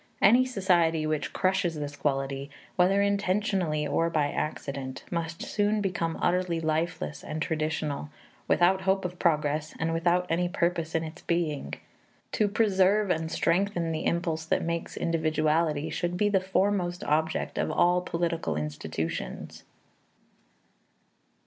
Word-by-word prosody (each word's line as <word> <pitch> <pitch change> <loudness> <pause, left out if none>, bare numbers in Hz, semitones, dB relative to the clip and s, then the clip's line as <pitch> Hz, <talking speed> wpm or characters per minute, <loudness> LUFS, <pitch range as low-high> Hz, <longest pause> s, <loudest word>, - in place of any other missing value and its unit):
Any 245 +6 +6
society 175 -8 +2
which 155 -1 -1
crushes 185 -3 +1
this 145 -1 -5
quality, 135 -1 -2 0.3
whether 195 +2 +4
intentionally 195 -5 0
or 165 +3 +1
by 150 -3 +1
accident, 135 -3 -4
must 170 -1 -3
soon 210 +1 +1
become 180 -5 -1
utterly 180 -1 +1
lifeless 155 - -2
and 155 - -4
traditional, 155 -3 -2 0.4
without 185 +2 +4
hope 190 0 +1
of 180 0 -5
progress 155 -2 +1
and 165 0 0
without 175 +2 +2
any 175 +1 0
purpose 170 -3 -1
in 160 - +1
its 160 +2 -8
being. 165 -4 -1 0.6
To 210 - +2
preserve 200 -1 +3
and 160 -1 -1
strengthen 175 -1 +1
the 155 -1 -1
impulse 170 -2 -1
that - - +1
makes 170 0 -3
individuality 155 -1 +1
should 175 0 -2
be 205 +2 +2
the 195 -2 +2
foremost 190 -2 0
object 160 +1 0
of - - 0
all 180 +1 +3
political 165 - -2
institutions. 80 +2 -4
170 Hz, 130 wpm, -28 LUFS, 155-185 Hz, 0.6 s, Any